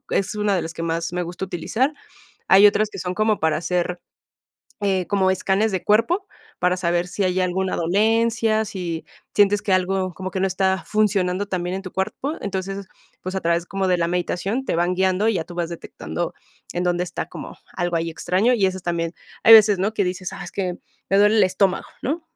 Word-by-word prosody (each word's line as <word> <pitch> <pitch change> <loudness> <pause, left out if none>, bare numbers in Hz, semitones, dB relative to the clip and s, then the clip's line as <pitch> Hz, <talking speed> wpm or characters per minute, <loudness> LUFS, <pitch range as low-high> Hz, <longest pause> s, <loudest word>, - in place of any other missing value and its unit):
es 200 +2 0
una 210 -1 +1
de 170 - -1
las 160 - -5
que 165 - -5
más 165 +1 -2
me 180 - -1
gusta 175 +2 -5
utilizar. 220 - -1 0.6
Hay 195 +2 +7
otras 215 +1 +2
que - - -8
son 180 0 -3
como 215 0 +1
para 160 -1 +1
hacer, 175 +1 -1 0.8
eh, 190 -3 0
como 190 -1 +2
escáneres 195 +3 +1
de 185 - -1
cuerpo, 285 - +2 0.3
para 180 +1 +2
saber 175 0 0
si 200 +2 -2
hay 185 0 +1
alguna 185 +1 0
dolencia, 220 +4 +2
si 175 -6 -4 0.3
sientes 205 0 +4
que 205 - 0
algo 185 0 +1
como 185 0 -5
que 190 - -3
no 195 - +2
está 190 0 0
funcionando 200 -2 +1
tan 185 -2 -2
bien 180 +2 -2
en 195 - -5
tu 185 - -8
cuerpo, 270 +10 -2
entonces, 195 0 -4 0.4
pues, 185 +1 -5
a 190 - -1
través 170 +1 +1
como 195 0 -1
de 180 - +3
la 170 0 +1
meditación 180 +7 -1
te - - 0
van 175 +1 +1
guiando 190 +3 +2
y 225 - +2
ya 165 - -1
tú 175 - -11
vas 175 -1 -2
detectando 80 - -5 0.4
en 175 +1 -1
dónde 175 0 +1
está 180 - -5
como - - -9 0.2
algo 175 -1 -1
ahí 165 0 -1
extraño, 185 +8 +1
y 205 -5 +3
eso 185 0 -2
también 170 -1 -2 0.3
hay 225 - +10
veces, 210 -3 +7
¿no?, 200 +4 0
que 205 - +1
dices: 180 0 -3
"Ah, - - -7
es - - -9
que 185 -3 -2 0.3
me 195 - +3
duele 210 +2 +5
el 210 - +5
estómago", 185 0 +1 0.2
¿no?, 310 +6 -2
190 Hz, 215 wpm, -22 LUFS, 175-205 Hz, 0.8 s, hay